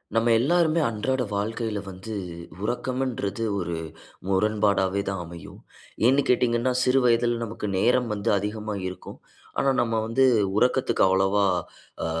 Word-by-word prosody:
நம்ம 115 +1 +3
எல்லாருமே 165 +4 +2
அன்றாட 125 +4 -1
வாழ்க்கையில 110 +1 -2
வந்து 95 +4 -8 0.5
உறக்கம்ன்றது 120 -2 -2 0.2
ஒரு 85 -2 -3 0.5
முரண்பாடாவே 100 -1 +1
தான் 95 -2 -3
அமையும். 85 -1 -11 0.5
ஏன்னு 135 +3 +5
கேட்டீங்கன்னா, 120 0 +2
சிறு 130 +1 +3
வயதில 120 0 +3
நமக்கு 110 -1 -5
நேரம் 125 +4 +2
வந்து 100 -1 -2
அதிகமா 105 +2 -4
இருக்கும். 90 - -9 0.4
ஆனா, 135 - +2
நம்ம 115 -1 -1
வந்து 115 +4 +2 0.3
உறக்கத்துக்கு 125 +3 +2
அவ்வளவா 95 +2 +2 0.8
ஆ - - -1
115 Hz, 125 wpm, -25 LUFS, 100-125 Hz, 0.8 s, ஏன்னு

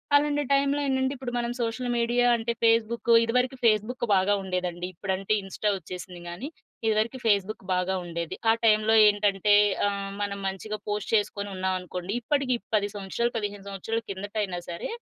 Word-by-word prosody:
అలాంటి 290 0 +3
టైమ్‌లో 280 +1 +2
ఏంటంటే, 265 0 +1
ఇప్పుడు 250 -1 -5
మనం 240 0 -2
సోషల్ 235 +2 -2
మీడియా 240 +1 +2
అంటే 235 +1 -2
ఫేస్‌బుక్కు, 230 +1 +3
ఇదివరకు 250 +3 +1
ఫేస్‌బుక్ 225 +3 +2
బాగా 190 +2 +3
ఉండేదండి. 180 -1 -3
ఇప్పుడంటే 190 +3 -2
ఇన్స్టా 200 +2 -1
వచ్చేసింది 180 -1 -9
గానీ 180 - -6 0.4
ఇదివరకు 220 +3 +1
ఫేస్‌బుక్ 205 -1 +1
బాగా 180 +1 0
ఉండేది. 170 -1 -4
ఆ - - +8
టైమ్‌లో 215 0 +4
ఏంటంటే 205 -1 +3 0.3
ఆహ్, 200 -1 -3
మనం 200 -1 -2
మంచిగా 205 +3 -4
పోస్ట్ 210 0 -2
చేసుకొని 205 -1 -1
ఉన్నామనుకోండి 185 0 -3
ఇప్పటికి 275 -1 +1 0.2
10 205 -1 +1
సంవత్సరాలు, 205 +4 -2
15 205 -2 -4
సంవత్సరాల 220 +4 -3
కిందట 200 +2 -6
అయినా 180 -3 -3
సరే 170 - -5
210 Hz, 150 wpm, -27 LUFS, 190-235 Hz, 0.4 s, ఆ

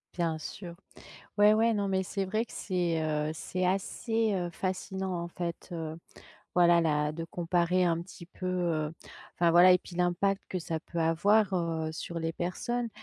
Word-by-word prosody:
Bien 165 -3 0
sûr, 170 +2 -8 0.6
ouais, 210 +1 +7
ouais, 225 +1 +3
non 200 -1 0
mais 190 0 +1
c'est 195 +1 -2
vrai 215 +5 -1
que - - -15
c'est, 175 -4 -1
heu, 150 0 0
c'est 185 +3 -2
assez, 220 +4 0
heu, 175 -2 -1
fascinant 190 +1 -3
en 170 - -4
fait, 170 0 -5
heu, 160 -1 -5 0.6
voilà, 175 -1 +6
là, 150 -2 +1
de 165 +1 -5
comparer 175 +1 +1
un 170 -1 +1
petit 175 0 -11
peu, 185 +1 -8
heu 170 -4 0 0.4
enfin 170 -1 +3
voilà 180 +2 +8
et 180 - +5
puis 175 - -12
l'impact 180 +3 +1
que 185 - -2
ça 160 -1 -3
peut 170 0 -5
avoir, 195 +5 +3
heu, 165 -3 -1
sur 170 +1 -5
les 165 0 -2
personnes. 235 +8 -2
175 Hz, 180 wpm, -30 LUFS, 165-190 Hz, 0.6 s, voilà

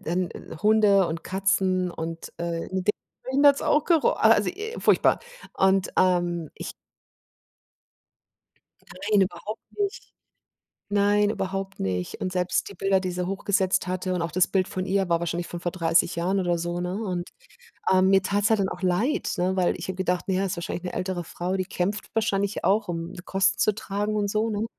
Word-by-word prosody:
dann 175 +2 -1 0.3
Hunde 210 -3 +5
und 165 0 -4
Katzen 185 -1 +1
und, 165 0 -6
äh, 170 -1 -2
in 185 0 -2
de 210 - +3 0.3
Drinnen 275 +3 +3
hat's 280 -1 +6
auch 295 0 +2
gero 330 -4 +3
a - - -9
also, - - +4
i 425 +5 -5
furchtbar. - - +4 0.3
Und, 190 0 +2
ähm, 175 -3 +1
ich - - -6 2.2
Nein, 205 +2 +1
überhaupt 185 +5 -7 0.2
nicht. 405 -1 -3 0.8
Nein, 205 0 +3
überhaupt 195 -2 -3
nicht. 90 -2 -3
Und 185 - -2
selbst 180 0 0
die - - -10
Bilder, 195 +1 +2
die 185 -1 -3
sie 180 0 -2
hochgesetzt 190 -1 0
hatte 185 0 -2
und 180 - -1
auch 165 -1 -2
das 185 +3 +3
Bild 190 -1 +1
von 185 0 -4
ihr 195 0 +1
war 170 -1 +3
wahrscheinlich 170 0 -3
von 175 - -6
vor 175 - -2
30 165 -2 +2
Jahren 185 +4 +1
oder 175 -2 +1
so, 175 +1 -3
ne? 180 +1 -3
Und, 185 -5 -3 0.6
äh, 185 0 +5
mir 190 +1 +5
tat's 205 +2 +1
halt 220 -2 +3
dann 190 -1 +1
auch 180 - -7
leid, 195 - +1
ne, 185 +2 +1
weil 185 -2 +2
ich 175 - -6
habe 190 - -3
gedacht, 180 -1 -1
na 190 - +1
ja, 195 +1 +1
ist 190 -1 -3
wahrscheinlich 170 +1 -4
'ne 180 - -5
ältere 185 -1 -2
Frau, 175 +3 -3
die 185 - 0
kämpft 195 +4 -3
wahrscheinlich 200 -2 0
auch, 205 +3 +2
um 170 +1 -4
Kosten 195 +1 +2
zu 215 - +3
tragen 205 0 -2
und 205 -1 0
so, 215 +2 0
ne? 210 0 -1
190 Hz, 190 wpm, -25 LUFS, 175-200 Hz, 2.2 s, hat's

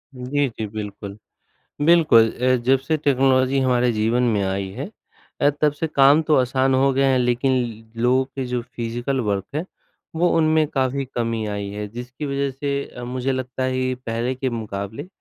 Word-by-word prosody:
जी, 135 +3 -1
जी, 110 -1 -5
बिल्कुल। 105 -1 -7 0.7
बिल्कुल 150 -10 +6
अ, 130 +1 +1
जब 130 +1 +3
से 155 +3 -1
टेक्नोलॉज़ी 135 -1 +2
हमारे 125 -2 +2
जीवन 115 +3 +1
में 110 -4 +1
आई 95 0 -2
है - - -5 0.5
अ, 145 - +5
तब 150 -1 +4
से 160 +2 -3
काम 140 +2 +5
तो 155 -1 +2
आसान 130 +1 +2
हो 135 +1 +3
गए 135 +1 +2
हैं 130 -1 +3
लेकिन 125 +2 +1 0.4
ल 115 - -5
लोगों 130 +2 +3
के 135 -1 -6
जो 125 -1 -2
फ़िज़िकल 120 +2 -3
वर्क 100 -1 -1
है 155 - -1 0.5
वो 175 +2 +2
उनमें 155 -1 +3
काफ़ी 135 -1 -1
कमी 115 -2 -1
आई 100 -1 -4
है, 105 +1 -5
जिसकी 125 +6 -7
वज़ह 140 0 -1
से 140 +1 -2
अ, 125 - -10
मुझे 130 +2 -2
लगता 130 0 -3
है 130 0 -1
ये 130 0 0
पहले 120 +3 -2
के 130 0 -2
मुक़ाबले 110 - -5
130 Hz, 185 wpm, -22 LUFS, 115-135 Hz, 0.7 s, बिल्कुल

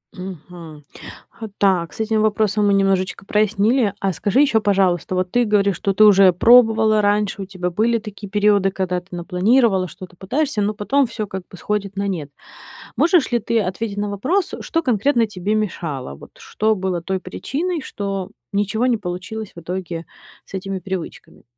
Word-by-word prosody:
Мгм. 175 -4 -10 0.6
А 220 - -4
так, 185 -4 +2
с - - -12
этим 220 0 +1
вопросом 210 -1 +1
мы 200 - +3
немножечко 195 0 0
прояснили. 215 +2 +2
А 195 -1 -1
скажи 205 - +1
ещё, 230 -7 +3
пожалуйста, 185 -3 +1
вот 185 0 -1
ты 245 - +3
говоришь, 200 -2 +2
что 195 - -1
ты 215 - +4
уже 195 -2 +7
пробовала 220 +1 +5
раньше, 205 -1 0
у - - -4
тебя 185 -2 -4
были 225 +6 +1
такие 205 -2 -9
периоды, 205 -1 +3
когда 185 -1 -2
ты 180 - -28
напланировала, 190 +3 +2
что-то 180 +1 -12
пытаешься, 220 - -1
но 205 +1 0
потом 260 +6 +1
всё 225 -2 -4
как 190 -1 -6
бы 185 - -12
сходит 200 +2 -3
на 200 0 -2
нет. 165 -7 -4 0.7
Можешь 340 -4 +3
ли 240 - +2
ты 230 +1 0
ответить 200 +2 -3
на 205 0 -2
вопрос, 305 - -1
что 330 - -1
конкретно 245 -2 +2
тебе 205 0 -3
мешало? 165 - -3
Вот - - -14
что 220 +1 0
было 185 -3 -2
той 190 +2 -3
причиной, 315 - -3
что 195 -6 -5 0.2
ничего 205 +4 0
не 245 -2 +2
получилось 200 +2 -6
в 170 - -10
итоге 170 -1 -5 0.4
с - - -17
этими 195 0 -4
привычками? 185 -1 -7
200 Hz, 175 wpm, -20 LUFS, 185-220 Hz, 0.7 s, уже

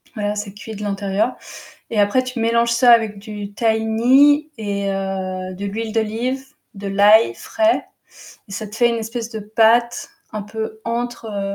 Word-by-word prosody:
voilà, 210 -1 -2
c'est 205 -1 -5
cuit 215 +2 -9
de 210 - -7
l'intérieur 200 +3 -1 0.5
et 220 - -1
après 205 +6 +3
tu 255 -1 -5
mélanges 235 +1 +2
ça 240 +1 +5
avec 220 -3 +3
du 205 -1 -8
tahini 240 +7 +3
et 200 -2 -2
heu, 190 -1 -3
de 200 +2 -6
l'huile 215 +2 -4
d'olive, 230 +4 -1 0.3
de 200 0 -7
l'ail 200 - +5
frais 330 +1 0 0.6
et - - -11
ça 215 +2 -4
te 210 +2 -10
fait 240 0 +4
une 235 - 0
espèce 230 +1 -4
de 220 - -5
pâte 225 +3 +2 0.2
un 215 -1 -4
peu 220 +1 -6
entre, 235 0 -3
heu, 200 -2 -3
220 Hz, 170 wpm, -20 LUFS, 205-235 Hz, 0.6 s, ça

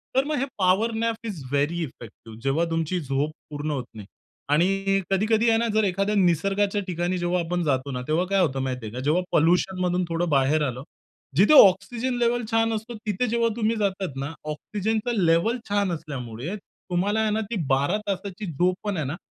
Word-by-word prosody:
तर 265 - +4
मग 300 +1 -1
हे 270 - 0
power 195 +4 +3
nap 230 0 -2
is 180 -10 -6
very 145 +5 0
effective. 115 -4 -11
जेव्हा 140 +5 +1
तुमची 165 +2 -1
झोप 140 +1 -1 0.2
पूर्ण 150 0 -4
होत 130 -4 -3
नाही. 105 -3 -9 0.4
आणि 195 +5 +2
कधी-कधी 220 +4 +3
आहे 225 - +4
ना 235 - +1
जर 215 0 +3
एखाद्या 195 +3 0
निसर्गाच्या 195 +3 +2
ठिकाणी 175 +1 -1
जेव्हा 175 +1 0
आपण 175 +1 -2
जातो 140 -2 0
ना 125 -1 -3
,तेव्हा 160 +4 +1
काय 195 0 +2
होतं 135 -6 +1
माहिती 125 -3 -3
आहे 105 - -7
का? 125 - -5
जेव्हा 150 +7 +1
पोल्युशनमधून 180 +2 +2
थोडं 170 +1 -1
बाहेर 145 +2 +3
आलं 125 +1 -5 0.5
जिथे 205 - +6
ऑक्सिजन 240 +7 -2
लेव्हल 240 0 +1
छान 225 0 +2
असतो 225 +2 -5
तिथे 210 +4 0
जेव्हा 230 0 +2
तुम्ही 225 0 +1
जातात 195 -7 -2
ना, 140 +2 -3 0.2
ऑक्सिजनचा 215 +8 -2
लेव्हल 170 +8 +3
छान 200 -2 +1
असल्यामुळे 140 - -5
तुम्हाला 200 +1 -3
आहे 215 -1 +1
ना 220 +1 0
ती - - -1 0.2
12 140 +9 +2
तासाची 195 +1 -4
झोप 180 +5 +1
पण 205 -3 -2
आहे 155 - -1
ना 140 +4 -3
180 Hz, 190 wpm, -25 LUFS, 150-210 Hz, 0.5 s, जिथे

